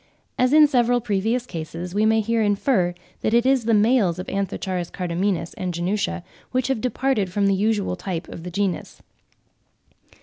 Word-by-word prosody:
As 255 Hz, 0 st, +3 dB
in 305 Hz, 0 st, +8 dB
several 245 Hz, -3 st, +2 dB
previous 225 Hz, +2 st, -1 dB
cases, 170 Hz, -2 st, -6 dB
we 210 Hz, +2 st, +2 dB
may 220 Hz, 0 st, +3 dB
here 230 Hz, +1 st, 0 dB
infer 200 Hz, -3 st, +1 dB, 0.3 s
that 220 Hz, -, +1 dB
it 235 Hz, +1 st, +3 dB
is 260 Hz, -3 st, +3 dB
the 230 Hz, -, +2 dB
males 210 Hz, -5 st, +3 dB
of 185 Hz, -, -5 dB
Anth. 195 Hz, 0 st, -2 dB, 0.3 s
cardamines 180 Hz, -1 st, -2 dB
and 180 Hz, -2 st, -3 dB
genutia 175 Hz, -, -1 dB, 0.3 s
which 255 Hz, 0 st, 0 dB
have 265 Hz, -5 st, 0 dB
departed 250 Hz, -6 st, 0 dB
from 200 Hz, +2 st, +1 dB
the 195 Hz, -, +3 dB
usual 205 Hz, -1 st, 0 dB
type 175 Hz, -2 st, -5 dB
of -, -, -9 dB
the 180 Hz, -, -6 dB
genus. 195 Hz, 0 st, -3 dB
205 Hz, 170 wpm, -23 LUFS, 180-235 Hz, 0.3 s, in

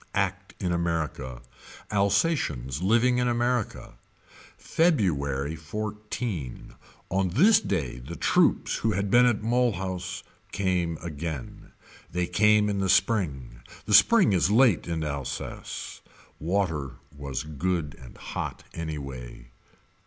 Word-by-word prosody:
Act -, -, -1 dB
in 90 Hz, -, -1 dB
America. 80 Hz, -8 st, -2 dB, 0.5 s
Alsatians 100 Hz, -, +1 dB
living 120 Hz, +6 st, +3 dB
in 125 Hz, -, +1 dB
America. 120 Hz, -1 st, -1 dB, 0.6 s
February 80 Hz, -, +1 dB
XIV. 105 Hz, -, -5 dB, 0.4 s
On 95 Hz, 0 st, +1 dB
this 195 Hz, -, +5 dB
day 75 Hz, -, -2 dB
the 70 Hz, +8 st, -8 dB
troops -, -, +2 dB
who 110 Hz, -1 st, 0 dB
had 100 Hz, +1 st, -1 dB
been 125 Hz, +1 st, +6 dB
at 110 Hz, -3 st, 0 dB
Mulhouse 95 Hz, -6 st, -1 dB, 0.3 s
came 90 Hz, -4 st, 0 dB
again. 80 Hz, -4 st, -6 dB, 0.4 s
They 90 Hz, 0 st, 0 dB
came 105 Hz, +3 st, +4 dB
in 100 Hz, -1 st, -1 dB
the 95 Hz, -1 st, 0 dB
spring. 70 Hz, -, +1 dB, 0.3 s
The 105 Hz, -, -1 dB
spring 205 Hz, -, +6 dB
is 90 Hz, 0 st, +3 dB
late 110 Hz, -, +4 dB
in 80 Hz, -2 st, -2 dB
Alsace. 70 Hz, -4 st, -5 dB, 0.4 s
Water 80 Hz, -6 st, -1 dB, 0.2 s
was 70 Hz, -2 st, -4 dB
good 75 Hz, +1 st, -2 dB
and 65 Hz, -, -13 dB
hot -, -, -5 dB
anyway. 70 Hz, -7 st, -7 dB
90 Hz, 115 wpm, -27 LUFS, 75-105 Hz, 0.6 s, been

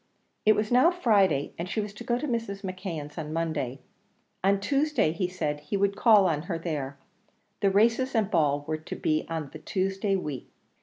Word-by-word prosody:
It 215 Hz, -, +7 dB
was 210 Hz, +1 st, -1 dB
now 255 Hz, +7 st, +6 dB
Friday, 205 Hz, -, +2 dB
and 175 Hz, +2 st, -3 dB
she 220 Hz, -, -1 dB
was 210 Hz, -1 st, -3 dB
to 210 Hz, -, -9 dB
go 240 Hz, -, 0 dB
to 300 Hz, -, -3 dB
Mrs. 230 Hz, -5 st, -3 dB
McKeon's 175 Hz, -6 st, -5 dB
on 155 Hz, -1 st, -5 dB
Monday; 155 Hz, -6 st, -2 dB, 0.6 s
on 195 Hz, +1 st, +3 dB
Tuesday 275 Hz, -, +1 dB
he 175 Hz, +3 st, -1 dB
said 155 Hz, -5 st, -3 dB
he 150 Hz, +7 st, -3 dB
would 200 Hz, 0 st, +1 dB
call 210 Hz, -2 st, +6 dB
on 155 Hz, -5 st, +1 dB
her 170 Hz, -, -1 dB
there; 145 Hz, -5 st, -4 dB, 0.6 s
the 200 Hz, -, +3 dB
races 230 Hz, +6 st, +2 dB
and 215 Hz, -2 st, +1 dB
ball 145 Hz, -4 st, +2 dB
were 155 Hz, 0 st, -1 dB
to 155 Hz, -, -7 dB
be 155 Hz, 0 st, 0 dB
on 160 Hz, -4 st, -4 dB
the 155 Hz, -, -8 dB
Tuesday 195 Hz, +3 st, -1 dB
week. 150 Hz, -9 st, -4 dB
190 Hz, 195 wpm, -27 LUFS, 155-210 Hz, 0.6 s, It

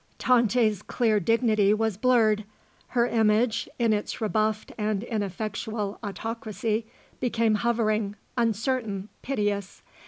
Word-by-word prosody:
Tante's 235 Hz, -4 st, +3 dB
clear 220 Hz, -4 st, +1 dB
dignity 215 Hz, -2 st, +3 dB
was 220 Hz, -2 st, 0 dB
blurred; 220 Hz, -2 st, +3 dB, 0.4 s
her 240 Hz, -1 st, +2 dB
image, 225 Hz, 0 st, +2 dB
in 230 Hz, -3 st, +3 dB
its 210 Hz, 0 st, -2 dB
rebuffed 215 Hz, 0 st, 0 dB
and 210 Hz, -1 st, -1 dB
ineffectual 215 Hz, -1 st, -3 dB
autocracy, 220 Hz, +1 st, -3 dB, 0.3 s
became 230 Hz, -3 st, +1 dB
hovering, 215 Hz, -2 st, +1 dB, 0.2 s
uncertain, 225 Hz, -3 st, -1 dB
piteous. 205 Hz, -7 st, -2 dB
220 Hz, 100 wpm, -26 LUFS, 210-230 Hz, 0.4 s, Tante's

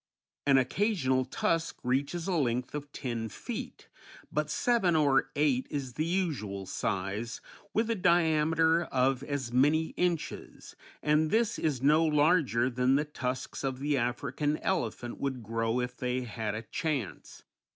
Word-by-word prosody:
An 135 Hz, -1 st, +6 dB
occasional 130 Hz, -, +1 dB
tusk 165 Hz, -, -1 dB
reaches 140 Hz, +7 st, -1 dB
a 190 Hz, -, 0 dB
length 125 Hz, -5 st, 0 dB
of 145 Hz, -1 st, -6 dB
ten 115 Hz, -5 st, -4 dB
feet, -, -, -7 dB, 0.4 s
but 150 Hz, 0 st, -1 dB
seven 195 Hz, -2 st, +2 dB
or 140 Hz, -3 st, +3 dB
eight 140 Hz, -3 st, +2 dB
is 135 Hz, -4 st, -4 dB
the 155 Hz, +6 st, -1 dB
usual 140 Hz, -, -2 dB
size, 100 Hz, +5 st, -3 dB, 0.3 s
with 220 Hz, +1 st, +1 dB
a 230 Hz, -, +1 dB
diameter 165 Hz, -2 st, +3 dB
of 130 Hz, -1 st, +1 dB
as 140 Hz, -4 st, -4 dB
many 150 Hz, +5 st, +3 dB
inches, 175 Hz, -3 st, -3 dB, 0.3 s
and 155 Hz, +1 st, +3 dB
this 225 Hz, +3 st, +1 dB
is 140 Hz, -5 st, -1 dB
no 155 Hz, +3 st, +5 dB
larger 150 Hz, -5 st, +3 dB
than 125 Hz, +1 st, +2 dB
the 150 Hz, +2 st, +1 dB
tusks 130 Hz, -4 st, -4 dB
of 135 Hz, -1 st, -1 dB
the 145 Hz, +2 st, 0 dB
African 135 Hz, +4 st, -1 dB
elephant 120 Hz, -, -2 dB
would 130 Hz, -3 st, -3 dB
grow 115 Hz, +2 st, -1 dB
if 125 Hz, 0 st, -3 dB
they 125 Hz, -1 st, -1 dB
had 110 Hz, -3 st, -4 dB
a 110 Hz, -, -5 dB
chance. 130 Hz, -, -4 dB
140 Hz, 145 wpm, -30 LUFS, 125-160 Hz, 0.4 s, An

